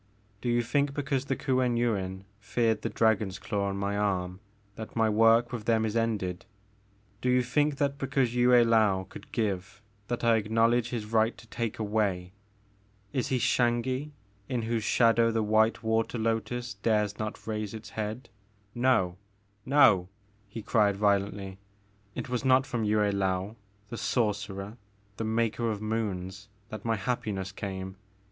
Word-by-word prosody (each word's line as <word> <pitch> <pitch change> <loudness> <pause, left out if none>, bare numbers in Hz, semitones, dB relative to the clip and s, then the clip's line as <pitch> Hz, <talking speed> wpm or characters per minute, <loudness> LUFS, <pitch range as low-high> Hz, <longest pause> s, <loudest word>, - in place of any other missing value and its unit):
Do 120 - -2
you 120 0 +2
think 140 +3 0
because 140 -2 -1
the 135 - -1
Kuen 130 -3 +1
Yuin 95 -5 -1 0.2
feared 110 +2 0
the - - -2
dragon's 110 -4 +1
claw 100 -3 -2
on 100 - -3
my 100 +1 -1
arm 95 -3 -1 0.3
that 110 +1 -9
my 115 -1 +3
work 115 +2 +4
with 115 -4 -5
them 110 -1 +2
is 110 0 -2
ended? 105 -5 -1 0.7
Do 125 - 0
you 125 0 +3
think 145 +4 +1
that 140 0 -1
because 135 -3 0
Yue 125 0 +3
I^ou 110 -6 +4
could - - -12
give, 95 -4 -2 0.3
that 120 0 -3
I 115 -1 +4
acknowledge 115 +2 +2
his 115 -4 -3
right 110 +1 +1
to - - -14
take 115 -1 -4
away? 100 -4 -1 0.8
Is 130 -3 0
he 130 - +1
Xangi 125 +4 +1 0.4
in 125 -3 -1
whose 115 -1 -1
shadow 115 0 +4
the 115 -1 0
white 110 +1 +2
water 110 +2 0
lotus 115 +2 -2
dares 105 0 0
not 110 0 -5
raise 110 -1 -3
its 110 0 -9
head? 110 +3 -4 0.5
No! 120 -8 +2 0.5
No! 115 -10 +5 0.2
*' 105 0 -36
he 110 +1 -7
cried 105 -3 +2
violently, 100 -1 0 0.6
it - - -4
was 125 -1 -2
not 130 0 +4
from 120 -5 -2
Yue 105 0 +2 0.2
Laou, 95 +1 -1 0.3
the 115 - -6
sor 105 +1 +1
cerer, 100 +2 -7 0.4
the - - -3
Maker 115 +1 0
of 105 -2 -2
Moons, 105 -2 -3 0.2
that 110 - -7
my 115 -1 +1
happiness 100 -3 -3
came! 95 -1 -6
110 Hz, 160 wpm, -28 LUFS, 100-120 Hz, 0.8 s, No